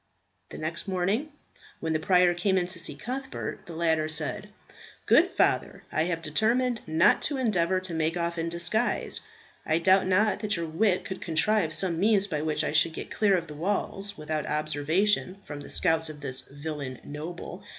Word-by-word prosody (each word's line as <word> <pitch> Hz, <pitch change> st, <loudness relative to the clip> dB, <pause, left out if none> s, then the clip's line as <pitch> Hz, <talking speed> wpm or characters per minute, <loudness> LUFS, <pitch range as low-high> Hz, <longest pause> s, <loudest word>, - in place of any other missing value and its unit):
The -, -, -8 dB
next 165 Hz, +5 st, -4 dB
morning 195 Hz, +10 st, 0 dB, 0.5 s
when 160 Hz, 0 st, -1 dB
the 155 Hz, -, +1 dB
prior 180 Hz, +1 st, +4 dB
came 190 Hz, +2 st, +1 dB
in 180 Hz, -, +2 dB
to 175 Hz, -1 st, -8 dB
see 165 Hz, -, -4 dB
Cuthbert, 265 Hz, +2 st, -5 dB
the 170 Hz, -, -8 dB
latter 160 Hz, -2 st, +1 dB
said, 155 Hz, -1 st, -1 dB, 0.6 s
"Good -, -, +5 dB
father, -, -, +1 dB
I 155 Hz, +2 st, +1 dB
have 165 Hz, -2 st, -2 dB
determined 230 Hz, +9 st, +1 dB
not 160 Hz, +3 st, +4 dB
to 285 Hz, -, -1 dB
endeavour 190 Hz, -7 st, +2 dB
to 185 Hz, -2 st, -5 dB
make 160 Hz, +1 st, 0 dB
off 170 Hz, 0 st, -2 dB
in 165 Hz, +1 st, -1 dB
disguise. 170 Hz, +8 st, 0 dB, 0.4 s
I 160 Hz, -, +1 dB
doubt 190 Hz, +3 st, +4 dB
not 205 Hz, +3 st, +3 dB
that 210 Hz, 0 st, -1 dB
your 170 Hz, -1 st, -2 dB
wit 185 Hz, +4 st, +1 dB
could 190 Hz, -, -6 dB
contrive 165 Hz, 0 st, +1 dB
some 170 Hz, -3 st, 0 dB
means 200 Hz, 0 st, +3 dB
by 155 Hz, -7 st, -2 dB
which 155 Hz, -1 st, 0 dB
I -, -, -1 dB
should 155 Hz, +1 st, +3 dB
get -, -, -7 dB
clear 200 Hz, -3 st, +3 dB
of 170 Hz, -, -3 dB
the 150 Hz, -, -9 dB
walls 195 Hz, +4 st, -2 dB
without 155 Hz, 0 st, -3 dB
observation 155 Hz, +6 st, 0 dB
from 145 Hz, -1 st, -7 dB
the -, -, -9 dB
scouts 160 Hz, -3 st, +1 dB
of 150 Hz, -1 st, -9 dB
this 130 Hz, -2 st, -3 dB
villain 145 Hz, -2 st, -6 dB
noble. 170 Hz, +5 st, -7 dB
170 Hz, 185 wpm, -28 LUFS, 155-195 Hz, 0.6 s, Good